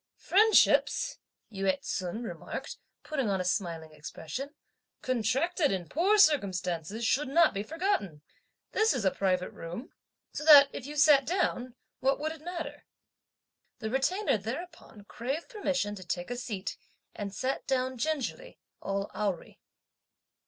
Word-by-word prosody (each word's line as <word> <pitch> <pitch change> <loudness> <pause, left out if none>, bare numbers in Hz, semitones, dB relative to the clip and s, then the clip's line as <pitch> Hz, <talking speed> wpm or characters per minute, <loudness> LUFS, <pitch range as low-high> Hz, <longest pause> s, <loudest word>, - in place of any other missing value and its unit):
"Friendships," 430 +3 +4 0.3
Yü 195 -1 +2
ts'un 185 +6 -4
remarked, 230 - -6 0.3
putting 270 -8 -1
on 195 -1 0
a 185 - -2
smiling 165 -3 -2
expression, 160 - -7 0.5
"contracted 270 - +1
in 185 -3 -2
poor 380 +7 +2
circumstances 200 - +2
should 285 +5 +2
not 325 +4 +4
be 200 - -2
forgotten! 215 - -2 0.5
This 440 +1 +3
is 230 -6 -2
a 190 - +4
private 185 -2 0
room; 175 +11 -8 0.4
so - - -4
that 290 -2 +9
if 265 - -6
you 295 - -7
sat 290 -2 +6
down, 255 -7 -1 0.2
what 270 +1 +1
would 310 +2 -2
it 320 -1 -10
matter?" 325 -4 -6 0.9
The 220 0 -4
Retainer 315 - +1
thereupon 240 - -7
craved 270 - -4
permission 280 - -1
to 190 -2 -8
take 175 +4 -4
a - - -1
seat, 230 -6 -5 0.4
and 200 -1 -5
sat 260 +6 -3
down 260 -1 0
gingerly, 315 - -3 0.2
all 195 0 -3
awry. 195 -2 -3
255 Hz, 140 wpm, -30 LUFS, 195-310 Hz, 0.9 s, that